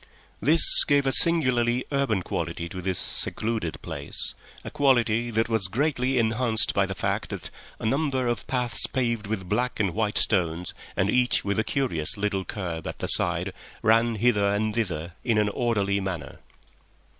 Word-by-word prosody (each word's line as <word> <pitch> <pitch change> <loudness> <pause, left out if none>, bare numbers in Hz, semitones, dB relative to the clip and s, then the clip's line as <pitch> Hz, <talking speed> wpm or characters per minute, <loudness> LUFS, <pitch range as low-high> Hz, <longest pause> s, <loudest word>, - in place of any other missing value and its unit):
This 155 +8 +8
gave 140 -1 +2
a 135 - +2
singularly 130 -7 +2
urban 135 -9 0
quality 85 0 -4
to 90 0 -7
this 95 -1 -2
secluded 110 -7 -2
place, 70 0 -3 0.3
a - - -7
quality 120 -4 +2
that 110 0 0
was 110 -4 0
greatly 130 +3 0
enhanced 115 0 +1
by 100 -1 +1
the 95 - -5
fact - - -2
that - - -7 0.3
a - - -6
number 135 +1 0
of 120 -1 -2
paths 125 -2 0
paved 115 -5 -2
with 100 -4 -4
black 120 +6 -1
and 100 -5 0
white 105 -1 -1
stones, 90 -4 +1 0.2
and 100 +2 +1
each 125 -4 +1
with 100 +1 -1
a - - +2
curious 110 - -2
little 100 -2 -1
kerb 85 -6 -5
at - - -6
the - - -4
side, - - +4 0.3
ran 115 +1 +3
hither 105 -2 +2
and 105 +1 -1
thither 85 -7 -3
in 115 -3 +1
an 105 -1 +2
orderly 100 -3 0
manner. 95 -6 -6
110 Hz, 170 wpm, -25 LUFS, 95-125 Hz, 0.3 s, This